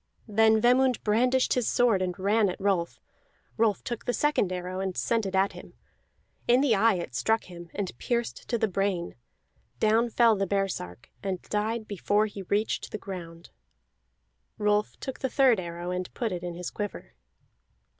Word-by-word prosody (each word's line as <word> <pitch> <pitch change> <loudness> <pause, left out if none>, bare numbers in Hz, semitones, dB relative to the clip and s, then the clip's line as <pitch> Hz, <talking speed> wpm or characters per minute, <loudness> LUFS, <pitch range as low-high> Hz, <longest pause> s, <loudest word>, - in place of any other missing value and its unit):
Then 220 +1 +4
Vemund 250 +1 +3
brandished 250 +4 +2
his 250 -3 0
sword 230 -6 +3
and 180 -1 -2
ran 205 +2 +2
at 180 - -5
Rolf; 190 -4 0 0.6
Rolf 220 -3 +1
took 240 -2 -5
the 245 - 0
second 295 -11 +1
arrow 185 +1 -4
and 190 -1 -3
sent 225 -3 0
it 190 - -3
at 195 +1 +3
him. - - -12 0.7
In 245 +2 +5
the 275 -5 +3
eye 220 +1 +4
it 170 -8 -5
struck 220 - +1
him, 175 -1 -11
and 195 -9 -3
pierced 235 -1 -2
to 235 - +1
the 220 - +1
brain; 195 -2 -1 0.7
down 225 +2 +3
fell 230 -1 +4
the 195 -1 -1
baresark, 180 - -3
and 190 -2 -2
died 215 +1 -2
before 205 +1 +1
he 205 -2 -7
reached 205 +3 -1
the - - -4
ground. 175 -4 -9 1.1
Rolf 210 0 +1
took 265 - -6
the 265 - -1
third 255 -4 +4
arrow 175 0 -5
and 180 0 -3
put 230 -3 -1
it 180 -1 -3
in 175 -1 -5
his 180 0 -5
quiver. 205 - -6
205 Hz, 175 wpm, -27 LUFS, 185-230 Hz, 1.1 s, In